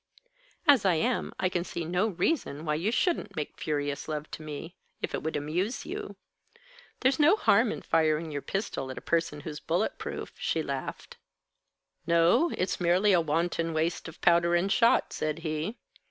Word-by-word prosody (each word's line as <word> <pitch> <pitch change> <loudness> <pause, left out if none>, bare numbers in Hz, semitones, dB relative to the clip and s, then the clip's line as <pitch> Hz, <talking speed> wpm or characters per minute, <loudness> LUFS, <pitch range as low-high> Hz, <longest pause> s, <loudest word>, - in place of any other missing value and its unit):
"As 280 -7 +7
I 185 -3 +3
am, 240 +10 0
I 185 - +2
can 180 -1 -1
see 170 -2 -5
no 180 +6 +1
reason 175 - -1
why 150 - +1
you 165 +7 0
shouldn't 330 - 0
make 150 -3 -5
furious 145 -2 -2
love 150 -1 -4
to - - -7
me, 155 +3 -7 0.2
if - - -4
it - - -2
would 160 - -3
amuse 175 - -2
you. 410 +3 -6 0.9
There's 260 +2 +3
no 305 +7 +6
harm - - +3
in - - -6
firing 160 0 +1
your 145 -1 -3
pistol 195 - -3
at 130 - -7
a - - -9
person 165 -3 0
who's 150 0 -6
bullet 175 +6 -1
proof," - - -6
she 160 - 0
laughed. 135 -2 -5 0.9
"No; 170 - +4
it's 185 0 -1
merely 180 +4 +4
a 175 - +5
wanton 165 +1 -1
waste 165 +2 -1
of 165 - -11
powder 170 0 +4
and 185 +3 +1
shot," 230 +1 +3
said 155 0 -2
he. 155 +8 -2
170 Hz, 180 wpm, -29 LUFS, 155-195 Hz, 0.9 s, As